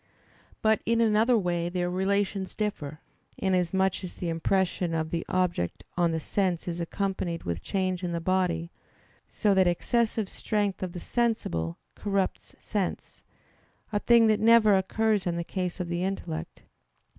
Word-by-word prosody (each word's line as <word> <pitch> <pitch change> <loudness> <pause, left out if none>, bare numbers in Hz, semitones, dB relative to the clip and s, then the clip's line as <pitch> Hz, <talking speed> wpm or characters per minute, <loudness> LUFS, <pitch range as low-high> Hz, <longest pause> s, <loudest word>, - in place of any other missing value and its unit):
But 220 0 +3
in 230 0 +1
another 225 +2 +4
way 175 -3 0
their 175 0 -1
relations 190 +1 -1
differ, 155 -8 -3 0.4
inasmuch 190 0 +1
as 180 - -6
the 175 - -3
impression 175 0 0
of 160 -1 -2
the 165 -1 -1
object 180 - 0
on 175 -1 +2
the 160 - -1
sense 180 +1 -1
is 175 0 -3
accompanied 175 -1 -2
with 85 0 -3
change 185 -2 -1
in 175 - -1
the 170 - -1
body; 170 -1 0 0.6
so 210 -3 +2
that 190 -1 +4
excessive 220 +4 +1
strength 205 -1 -1
of 185 -2 -3
the 180 - -5
sensible 170 - -1 0.2
corrupts 195 -2 -2
sense; 200 -4 -3 0.7
a 205 - +2
thing 235 +1 +5
that 215 -1 +3
never 220 -2 +6
occurs 210 +1 +1
in 170 -1 -1
the 170 - -1
case 180 +1 -3
of 180 - -2
the 175 +1 -2
intellect. 135 - -4
185 Hz, 155 wpm, -28 LUFS, 170-205 Hz, 0.7 s, never